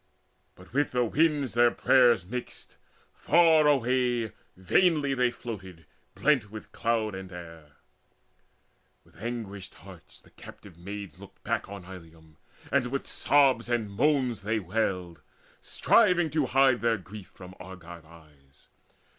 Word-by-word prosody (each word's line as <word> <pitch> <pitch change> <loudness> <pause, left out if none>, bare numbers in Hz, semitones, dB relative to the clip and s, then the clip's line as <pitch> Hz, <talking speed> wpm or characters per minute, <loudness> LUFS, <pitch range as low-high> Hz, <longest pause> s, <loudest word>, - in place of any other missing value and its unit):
But 90 +5 -17
with 145 -1 0
the 125 -1 +2
winds 150 0 +1
their 120 +1 +5
prayers 120 -7 +3
mixed; 125 +6 -8 0.4
far 160 -2 +4
away 125 -4 +1 0.3
Vainly 145 - +2
they 125 -2 +2
floated 95 -9 -9 0.3
blent 130 -9 +1
with 110 +1 -10
cloud 110 -2 -1
and 95 0 -8
air. 80 -4 -11 1.3
With - - -21
anguished 105 -5 -6
hearts - - -15
the - - -22
captive 100 -5 -14
maids 100 +2 -9
looked 100 0 -15
back - - -2
On 100 -2 -9
Ilium, 80 -4 -14 0.3
and 125 - +2
with 135 +2 -4
sobs 135 -5 +2
and 115 -4 -1
moans 130 +1 +1
they 110 +3 -1
wailed, 90 -5 -3 0.4
Striving 175 -4 +2
to 150 -3 0
hide 135 -2 +3
their 115 -1 +1
grief 95 +1 -11
from 90 -1 -13
Argive 85 -2 -11
eyes. 75 -4 -21
110 Hz, 130 wpm, -27 LUFS, 90-130 Hz, 1.3 s, their